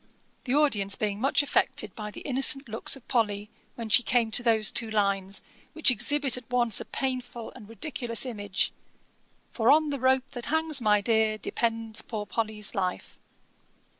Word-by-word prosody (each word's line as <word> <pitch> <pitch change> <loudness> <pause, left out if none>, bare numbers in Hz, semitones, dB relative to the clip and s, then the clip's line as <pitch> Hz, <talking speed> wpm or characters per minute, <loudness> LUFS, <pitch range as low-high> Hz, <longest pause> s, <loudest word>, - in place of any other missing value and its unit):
the 255 +1 +1
audience 210 -10 +2
being 210 -1 -3
much 275 +2 +3
affected 215 -7 -1
by 210 -1 -6
the - - -10
innocent 275 0 +1
looks 225 +4 -2
of 270 - -16
Polly, 210 -3 -1 0.2
when 230 -2 -6
she 220 +3 +5
came 235 -2 +1
to 245 - +3
those 225 -3 +3
two 230 -2 0
lines, 200 -2 -1 0.3
which 320 -4 +4
exhibit 265 +4 +2
at 250 -2 -11
once 240 -4 +1
a - - -7
painful 250 -3 -4
and 220 -5 -13
ridiculous 230 +1 -1
image, 205 -5 -2 0.8
'For 230 0 +3
on 305 0 +4
the 280 - -3
rope 260 +1 +1
that 245 -1 -4
hangs 315 -2 +2
my 210 -2 +3
Dear, 220 0 +2
Depends 225 0 -2
poor 215 -3 -5
Polly's 215 -1 -1
life.' 185 -2 -4
230 Hz, 165 wpm, -27 LUFS, 210-260 Hz, 0.8 s, she